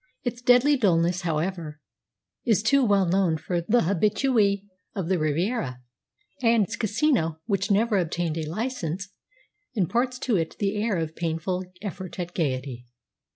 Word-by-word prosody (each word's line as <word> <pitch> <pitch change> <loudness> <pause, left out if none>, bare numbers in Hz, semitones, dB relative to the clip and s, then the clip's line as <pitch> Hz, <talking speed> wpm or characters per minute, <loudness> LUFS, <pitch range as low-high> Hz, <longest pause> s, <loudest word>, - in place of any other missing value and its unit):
Its 245 -1 -3
deadly 250 +4 +5
dullness, 180 -6 +2
however, 165 -2 -2 0.6
is 215 -5 +2
too 275 +4 +4
well 200 -4 +3
known 180 -2 +2
to 175 +2 -2
the 240 +2 +4
habitué 200 +3 +2 0.3
of 185 -4 -3
the 185 -2 +2
Riviera; 155 - -1 0.6
and 230 -3 +4
its 210 +2 -4
casino, 215 - +1
which 200 -1 0
never 210 0 +3
obtained 170 -1 -1
a 155 -1 -4
licence, 200 -3 -3 0.7
imparts 235 +6 0
to 240 -5 0
it 165 -2 -2
the 200 0 0
air 215 -4 0
of 160 -1 -3
painful 170 +2 -2 0.2
effort 185 -3 -6
at 175 0 -4
gaiety. 130 -5 -2
190 Hz, 145 wpm, -26 LUFS, 165-225 Hz, 0.7 s, deadly